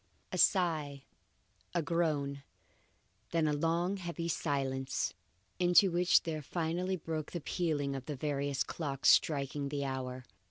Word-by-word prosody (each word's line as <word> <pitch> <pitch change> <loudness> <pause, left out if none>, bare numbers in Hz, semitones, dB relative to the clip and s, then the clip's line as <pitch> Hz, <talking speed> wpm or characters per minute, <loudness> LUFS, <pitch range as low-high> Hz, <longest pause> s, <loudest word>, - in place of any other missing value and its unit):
A - - -2
sigh, 155 -7 +2 0.7
a 170 - +2
groan, 150 -4 0 0.9
then 165 -2 +1
a 150 - +1
long 165 +4 +1
and 200 - -3
heavy 170 -1 -4
silence, 135 -4 -1 0.5
into 180 +2 +5
which 175 +1 +4
there 155 -2 -3
finally 175 +5 -1
broke 160 -3 -4
the 175 - -3
pealing 145 -5 -1
of 130 -2 -6
the 150 - -3
various 140 0 -1
clocks 140 -4 0
striking 140 -1 +3
the 140 -1 -2
hour. 130 -1 -4
150 Hz, 135 wpm, -33 LUFS, 140-170 Hz, 0.9 s, into